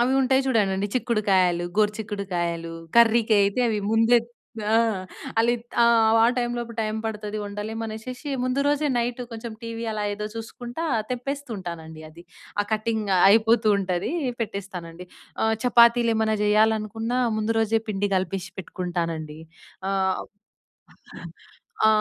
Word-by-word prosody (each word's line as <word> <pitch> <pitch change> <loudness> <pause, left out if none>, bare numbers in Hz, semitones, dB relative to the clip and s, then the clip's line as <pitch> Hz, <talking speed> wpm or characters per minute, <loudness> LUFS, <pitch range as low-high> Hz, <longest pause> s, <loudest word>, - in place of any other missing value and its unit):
అవి 260 +2 +1
ఉంటాయి 265 +1 +3
చూడండండి, 200 -5 +1
చిక్కుడుకాయలు, 195 -7 +2
గోరు 210 -1 +4
చిక్కుడుకాయలు, 175 -5 -3 0.2
కర్రీకయితే 225 -2 +4
అవి 210 -1 -1
ముందే 225 +2 +5 0.5
ఆ! 225 - +5 0.6
అలిత్ 235 0 0 0.2
ఆహ్, 230 -1 +5
వాళ్ళ 225 +2 +5
టైమ్ 240 0 -1
లోపు 235 -1 -5
టైమ్ 215 0 -1
పడతది, 215 -1 -4
వండలేమనేషేషి, 220 +6 -5
ముందు 255 +2 0
రోజే 290 +1 +1
నైటు, 240 +1 -1
కొంచం 230 0 -7
టీవీ 230 0 -5
అలా 215 -1 -3
ఏదో 210 +1 -4
చూసుకుంటా, 240 +6 -6 0.3
తెంపేస్తూ 275 +2 -4
ఉంటానండి 160 -4 -8
అది. 165 +2 -14 0.4
ఆ - - +3
కటింగ్ 220 -1 -1 0.2
అయిపోతూ 225 +2 +4
ఉంటదీ, 185 -2 -2 0.3
పెట్టేస్తానండి. 180 -5 -6 0.4
ఆహ్, 220 0 +2
చపాతీలేమన్నా 235 -3 +4
జెయ్యాలనుకున్నా, 220 +3 +1 0.2
ముందు 215 +1 0
రోజే 225 0 +2
పిండి 205 -1 -1
గలిపేషి 190 +1 -3
పెట్టుకుంటానండి. 165 -4 -4 0.5
ఆహ్ 190 -1 0 1.6
ఆ! - - +5
220 Hz, 120 wpm, -24 LUFS, 195-235 Hz, 1.6 s, ముందే